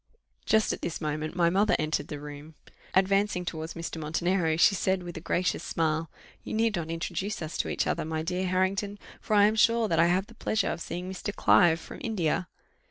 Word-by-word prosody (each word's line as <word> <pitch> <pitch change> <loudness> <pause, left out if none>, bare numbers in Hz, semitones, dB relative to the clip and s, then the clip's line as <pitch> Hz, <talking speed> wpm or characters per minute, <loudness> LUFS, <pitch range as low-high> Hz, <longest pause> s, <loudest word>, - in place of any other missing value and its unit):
Just 220 -1 +3
at - - -7
this 165 - -3
moment 155 +1 -3
my 170 -1 +3
mother 200 +3 +3
entered 155 0 -1
the 150 - -6
room. 150 +1 -10 0.4
Advancing 195 -1 +2
towards 160 -1 -5
Mr. 165 -1 -5
Montenero, 165 +1 0
she 185 - +6
said, 190 -1 0
with 175 -1 -7
a 160 - -6
gracious 180 +2 0
smile, 160 0 -1 0.3
"You - - -5
need 225 0 +2
not 165 -2 -3
introduce 175 +5 -3
us 155 -1 -5
to - - 0
each - - 0
other, - - -1
my 160 0 -3
dear 180 +2 -1
Harrington, 195 +3 0 0.2
for 215 - 0
I 205 0 +7
am 215 +1 +2
sure 230 +1 +4
that 165 -4 +1
I 165 - +6
have 185 +2 +2
the 235 - -16
pleasure 215 -2 0
of - - -5
seeing 180 +2 -5
Mr. 190 +2 -4
Clive, 170 -3 +5
from - - -10
India." 185 -5 -1
180 Hz, 210 wpm, -28 LUFS, 160-200 Hz, 0.4 s, I